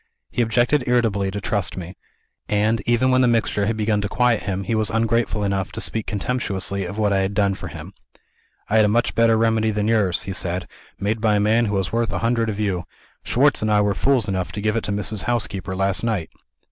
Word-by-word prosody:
He - - 0
objected 120 +4 +2
irritably 110 -5 +1
to 100 +2 -4
trust 100 -3 -2
me; 90 0 -7 0.5
and, 105 +2 +1
even 120 +2 +3
when 130 0 +4
the 125 - +4
mixture 110 -3 +1
had 110 0 -1
begun 105 -1 +1
to 100 - -3
quiet 125 -1 +2
him, 95 -1 -3
he 105 - -2
was 110 -1 +1
ungrateful 115 -1 0
enough 100 -2 -1
to 110 - -5
speak 110 -1 -3
contemptuously 100 -3 -2
of 100 +4 -6
what 105 -2 +2
I 95 - +2
had 95 +1 -1
done 100 -2 +2
for - - -7
him. - - -9 0.7
'I 110 - +2
had 110 - +6
a - - +3
much 120 +4 +1
better 115 -1 +4
remedy 110 -1 +2
than 105 0 -1
yours,' 105 -6 +1
he 95 - -4
said, 90 -1 -1 0.3
'made 105 +3 -1
by 110 -2 +3
a - - +2
man 110 +3 +3
who 105 -1 -1
was 95 0 -2
worth 115 -2 0
a 95 - -2
hundred 115 -1 +1
of 105 -1 -4
you. 95 -5 -1 0.4
Schwartz - - +2
and 110 - 0
I 105 0 +4
were 100 -1 +1
fools 130 -1 +1
enough 95 -2 -2
to 105 - -4
give 110 +1 0
it 115 - -1
to - - -2
Mrs. 105 0 -2
Housekeeper, 100 -6 -2
last 95 +1 -1
night.' 105 -8 -2
105 Hz, 235 wpm, -22 LUFS, 100-115 Hz, 0.7 s, had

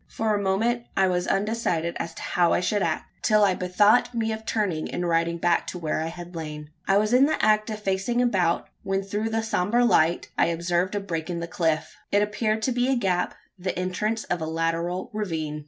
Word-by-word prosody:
For 220 -1 -1
a 205 - 0
moment 225 +5 0
I 190 -1 +4
was 180 -1 0
undecided 195 -5 0
as 165 0 -4
to - - -8
how 175 -2 +2
I - - +3
should 200 +3 0
act 160 -3 -3
till 215 -1 +4
I 195 -2 +4
bethought 205 +7 +3
me 225 -1 0
of 220 0 -6
turning, 190 -8 -1
and 175 - -2
riding 170 0 +1
back 170 0 +1
to - - -5
where 155 -2 -2
I 160 - -2
had 175 +1 -8
lain. 150 -2 -6 0.2
I 195 - +4
was 215 +3 +1
in 265 +3 +6
the 315 - 0
act 215 0 +3
of 215 -1 -4
facing 195 +5 0
about, 185 -9 +1
when 195 -1 -1
through 210 +3 -2
the 225 0 -1
sombre 220 +3 +2
light 165 -6 +3
I - - +5
observed 175 +3 0
a - - +1
break 170 -4 -4
in 170 -1 -2
the 170 - -3
cliff. 160 -2 -1
It 205 +1 +4
appeared 215 +1 -1
to 260 - +1
be 245 +1 +1
a - - +3
gap 185 -6 0 0.2
the 185 0 -3
entrance 210 +5 -1
of 175 -1 -2
a 160 - -2
lateral 165 +2 -2
ravine. 160 -8 -3
190 Hz, 220 wpm, -25 LUFS, 170-215 Hz, 0.2 s, in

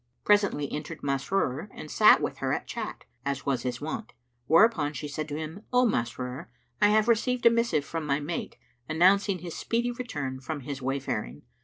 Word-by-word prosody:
Presently 200 -9 +2
entered 150 +2 -6
Masrur 140 +4 -1
and 155 - -8
sat - - +6
with - - -3
her - - -1
at - - -2
chat, - - -6 0.2
as 140 -1 -3
was 135 -3 0
his 125 -1 -3
wont, 160 +9 -5 0.3
whereupon 165 -4 +4
she 150 +2 -5
said 150 +1 -4
to 145 - -3
him, 160 +5 -6
"O 250 0 +4
Masrur, 125 - -2 0.3
I 205 - +7
have 215 +1 +3
received 240 +2 +1
a 235 - +9
missive 230 -11 +1
from 165 -2 -4
my 140 0 +1
mate, 155 +3 -4 0.3
announcing 190 +4 +4
his 170 -1 -7
speedy 240 +1 -1
return 145 - -4
from 145 +2 -5
his 135 +1 -6
wayfaring. 130 - -3
155 Hz, 180 wpm, -28 LUFS, 140-205 Hz, 0.3 s, a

